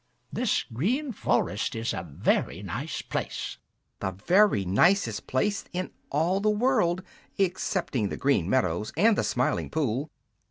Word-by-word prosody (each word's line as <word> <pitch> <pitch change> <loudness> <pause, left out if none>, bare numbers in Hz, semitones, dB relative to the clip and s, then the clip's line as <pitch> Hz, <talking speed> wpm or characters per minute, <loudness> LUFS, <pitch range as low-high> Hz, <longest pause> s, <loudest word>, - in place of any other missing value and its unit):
This 245 -4 +1
Green 230 - -1
Forest 105 - 0
is 115 +1 -2
a - - -3
very 75 -5 -1
nice - - -4
place." - - -4 0.4
"The - - -1
very 170 - +3
nicest 110 - +2
place 200 +11 0
in 185 +1 -3 0.2
all 165 +7 +1
the 215 +1 +2
world 210 -6 +2 0.3
excepting 180 - 0
the - - -4
Green 135 -11 +2
Meadows 105 -6 +1
and 215 +5 +5
the - - 0
Smiling 125 +1 0
Pool!" 140 -1 -1
160 Hz, 135 wpm, -27 LUFS, -, 0.4 s, and